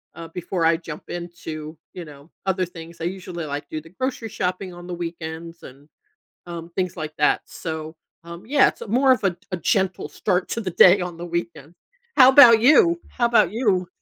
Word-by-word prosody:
uh, 165 - -8
before 175 0 -3
I 165 +1 +4
jump 165 -2 -9
into, 165 -3 -7 0.2
you 180 - -7
know, 145 0 -14 0.2
other 185 -1 0
things. 170 -1 -12
I 165 - -4
usually, 180 -2 -5
like, 145 0 -6
do 155 - -4
the 165 - -17
grocery 250 +2 -4
shopping 185 -1 -3
on 175 0 -11
the 180 - -5
weekends 165 -1 -7
and, 135 +3 -14 0.6
um, 170 0 -8
things 185 -2 -2
like 155 -1 -6
that 150 - +2
so, 160 -1 -6 0.3
um, 170 +2 -10
yeah, 275 +2 +4
it's - - -8
more 260 +4 +4
of 255 - 0
a 180 -3 +1 0.2
a - - 0
gentle 190 +2 0
start 185 -3 -1
to 230 - -2
the 190 -4 -3
day 185 +3 +6
on 180 -1 -5
the 175 +1 -7
weekend. 170 -2 -5 0.4
How 260 -1 +8
'bout 235 -5 +9
you? 340 - +5
How 240 -2 0
'bout 230 -6 +3
you? 200 -7 0
175 Hz, 195 wpm, -22 LUFS, 165-195 Hz, 0.6 s, bout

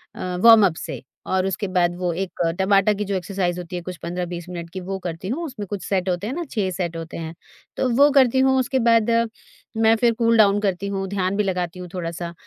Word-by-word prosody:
अ, - - -11 0.2
warm up 215 -7 +7
से, - - -6 0.2
और 190 0 0
उसके 195 +2 -2
बाद 175 -2 +1
वो 180 0 -1
एक 190 +2 -5 0.2
टाबाटा 195 +2 +3
की 205 0 -3
जो 200 0 -2
एक्सरसाइज़ 180 -1 -2
होती 180 0 -7
है 175 - -3
कुछ 180 0 -7
15-20 175 0 -4
मिनट 170 -2 -6
की, 185 - -6
वो 190 +1 -4
करती 175 0 -6
हूँ। 295 +9 -2
उसमें 230 -9 -6
कुछ 200 0 -5
सेट 190 -1 0
होते 180 +3 -2
हैं 245 - -3
ना, 345 +4 -3
6 205 -5 -1
सेट 175 -2 -3
होते 165 0 -7
हैं, 160 -1 -6 0.4
तो 260 - +1
वो 285 +3 +6
करती 260 -2 +4
हूँ। 265 0 +4
उसके 260 +1 0
बाद 230 -1 +4 0.7
मैं 225 0 +4
फिर 235 +1 +2
कूल-डाउन 220 -3 +4
करती 195 -1 -1
हूँ, 195 -1 -3
ध्यान 190 -1 -1
भी 210 - +2
लगाती 180 -2 -2
हूँ 180 - -7
थोड़ा-सा। 170 -1 -5
190 Hz, 225 wpm, -22 LUFS, 180-215 Hz, 0.7 s, warm up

